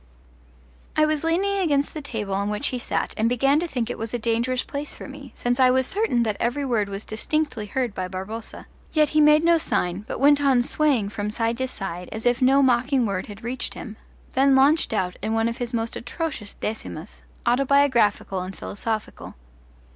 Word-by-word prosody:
I 310 - +5
was 305 -1 0
leaning 390 +5 +1
against 290 -6 +1
the 310 - -5
table 215 -8 -4
on 200 +1 0
which 210 +7 0
he 250 - -3
sat - - -2
and 220 +1 +2
began 275 +4 +3
to 345 - -2
think 245 -7 -2
it 245 - -5
was 225 +2 -3
a - - +1
dangerous 235 +2 0
place 285 +1 -6
for - - -9
me, 275 -1 -10
since 245 +1 -1
I 255 -1 +6
was 260 +1 +3
certain 385 - +1
that 215 -3 -1
every 250 +4 0
word 220 -6 0
was 200 +1 -5
distinctly 230 -1 -2
heard 245 0 -2
by 185 -1 -3
Barboza; 190 +5 -7 0.3
yet 305 -2 +4
he 305 - +3
made 300 +1 +6
no 335 0 +5
sign, 180 - -1
but - - -4
went 285 +1 +5
on 265 -4 +4
swaying 260 -7 +2
from 205 0 -3
side 230 +2 -1
to 260 - 0
side 180 -7 -6
as 220 +1 -5
if 245 +2 +2
no 270 +2 +5
mocking 255 0 +2
word 195 -3 -2
had 205 +2 -10
reached 245 +2 -4
him, 220 -3 -8 0.4
then 270 +1 +4
launched 285 +4 +4
out 185 -4 -1
in 220 - -1
one 225 0 +2
of 230 - -3
his 245 -1 -4
most 230 -1 -2
atrocious 245 -5 -5
decimas, 210 -4 -6 0.2
autobiographical 245 -7 +2
and 185 +1 -6
philosophical. 215 +1 -5
245 Hz, 200 wpm, -24 LUFS, 215-280 Hz, 0.4 s, I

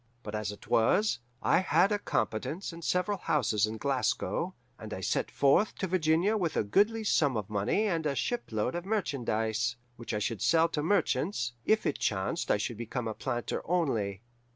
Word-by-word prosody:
But 105 - -7
as 105 -1 -2
it 105 - -12
was, 200 - +3 0.2
I - - +4
had 190 +1 +3
a 205 - +1
competence 165 - -2
and 165 0 -10
several 185 +4 0
houses 110 - +1
in 110 +1 -5
Glasgow, 130 -3 -1 0.2
and - - -6
I - - -6
set - - 0
forth 140 +10 +3
to - - -2
Virginia 180 +3 +2
with 175 -6 -1
a - - +3
goodly 210 - +2
sum 145 - +2
of 105 -1 -5
money 105 - +1
and 165 -6 0
a 140 - -1
shipload 125 - -1
of 175 - -3
merchandise, 120 - -1 0.2
which 115 -1 -5
I - - +1
should 110 0 -2
sell 165 0 +4
to 150 - -2
merchants, 165 - 0
if 220 0 +2
it - - -1
chanced 95 -2 -1
I - - +4
should 110 +2 -3
become 120 +1 -4
a 110 - -2
planter 120 0 -3
only. 115 - -1
140 Hz, 185 wpm, -30 LUFS, 110-185 Hz, 0.2 s, I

